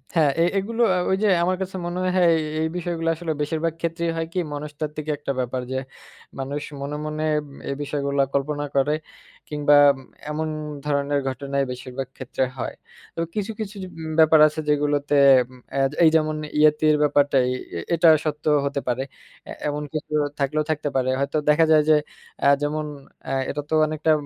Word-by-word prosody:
হ্যা 160 - +5 0.2
এ - - +6
এগুলো 225 +4 -1
আ - - +1
ওই 190 - +3
যে - - +4 0.2
আমার 185 +1 +1
কাছে 190 0 -4
মনে 175 +1 -3 0.2
হয় 175 -2 +5
এ 155 0 -4
এই 160 - +1
বিষয়গুলো 165 -1 -2
আসলে 165 -1 -4
বেশিরভাগ 160 +2 -1
ক্ষেত্রেই 170 0 -1
হয় 165 - -1
কি 185 - 0
মনস্তাত্ত্বিক 150 +1 -5
একটা 145 -1 -3
ব্যাপার 125 +1 -2
যে, 130 - -1 0.6
মানুষ 140 +2 -3 0.2
মনে, 145 +1 -4
মনে, 155 0 -3 0.5
এ - - 0
বিষয়গুলা 140 -1 -1
কল্পনা 145 +1 -1
করে 140 +2 +3 0.5
কিংবা 145 -1 +3 0.5
এমন 155 +1 -2 0.4
ধরনের 145 0 0
ঘটনাই 140 +1 -1
বেশিরভাগ 125 +1 -6
ক্ষেত্রে 130 0 -2
হয়। - - -4 0.4
তবে 165 - -2
কিছু, 210 +1 -2
কিছু, 210 -1 -5
উম 190 - -5
কিছু 160 -1 -6
ব্যাপার 160 0 +7
আছে 155 +1 -5
যেগুলোতে 145 0 +1 0.4
উম 125 - -15 0.2
এ্যা 135 0 +3 0.2
এই 160 - +8
যেমন 155 -1 +2 0.2
ইয়েতির 155 0 +4
ব্যাপারটাই 145 -3 +3 0.3
এ - - -2
এটা 165 0 +4 0.2
সত্য 150 -1 -3 0.2
হতে 140 0 -1
পারে। 125 +2 0 0.4
এ্যা - - -6
এমন 150 0 -2
কিছু 155 0 -4 0.3
থাকলেও 145 +2 +1
থাকতে 150 -1 -2
পারে। 130 0 +1
হয়তো 140 +3 -1
দেখা 160 +2 +5
যায় 155 -1 +7
যে 155 - +7 0.5
এ্যাঁ 140 0 +5
যেমন 150 +1 -1 0.4
এ্যাঁ 135 0 -1
এটা 150 - -2
তো - - -3
অনেকটা 155 +1 0
150 Hz, 175 wpm, -23 LUFS, 140-160 Hz, 0.6 s, এই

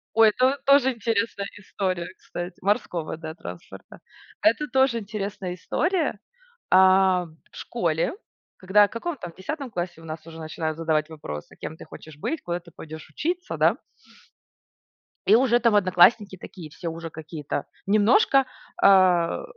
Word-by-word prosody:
Ой, 225 -1 +7
это 255 +5 +2
тоже 275 -1 +5
интересная 225 -3 -1
история, 185 -3 -3
кстати 175 +1 -7
Морского, 180 -5 -1
да, 160 -1 -7
транспорта. 90 - -11 0.4
Это 230 +8 +3
тоже 265 -4 +2
интересная 200 -3 -5
история. 315 - -1 0.5
А 185 -1 +5
в 160 0 -20
школе, 165 -8 -1 0.5
когда, 205 +2 +4
в - - -18
каком 310 +8 -4
там 175 -9 -8
10 275 - -5
классе 175 -4 -4
у - - -14
нас 155 0 -8
уже 165 0 -10
начинают 155 0 -4
задавать 160 -2 0
вопросы: 75 - -8
"Кем 160 - -7
ты - - -11
хочешь 155 -2 -12
быть?", 315 - -3
"Куда 175 0 -3
ты 170 0 -17
пойдешь 155 0 -10
учиться?" 350 - -3
Да? - - +3 1.5
И 210 - +6
уже 240 0 +4
там 235 -3 +3
одноклассники 190 +1 +4
такие 175 -2 -10
все 165 +3 -6
уже 165 0 -6
какие-то 155 -2 -5 0.2
немножко, 230 - +4 0.4
а 185 - +4
190 Hz, 145 wpm, -25 LUFS, 165-230 Hz, 1.5 s, Ой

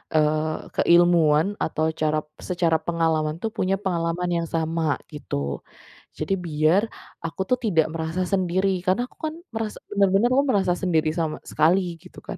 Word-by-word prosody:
eee, 155 0 +1
keilmuan 170 +1 +4
atau 160 0 0
cara 155 -1 0 0.2
secara 170 -3 +1
pengalaman 160 -2 0
tuh 225 - -1
punya 190 -2 0
pengalaman 180 -2 -1
yang 170 -1 0
sama, 160 -2 0 0.2
gitu. 70 - -4 0.6
Jadi 155 +5 -2
biar 160 +3 +2 0.4
aku 165 +3 -4
tuh 250 - +3
tidak 185 -10 +2
merasa 165 +2 -2
sendiri 185 0 +1
karena 190 +6 +2
aku - - -26
kan 310 - -4 0.2
merasa 225 -1 -3
bener-bener 200 +2 +3
aku 275 - +4
merasa 190 -5 +2
sendiri 165 -4 +1
sama 160 -1 -2
sekali 175 +2 +2
gitu - - -14
kan. - - -7
170 Hz, 150 wpm, -24 LUFS, 155-190 Hz, 0.6 s, keilmuan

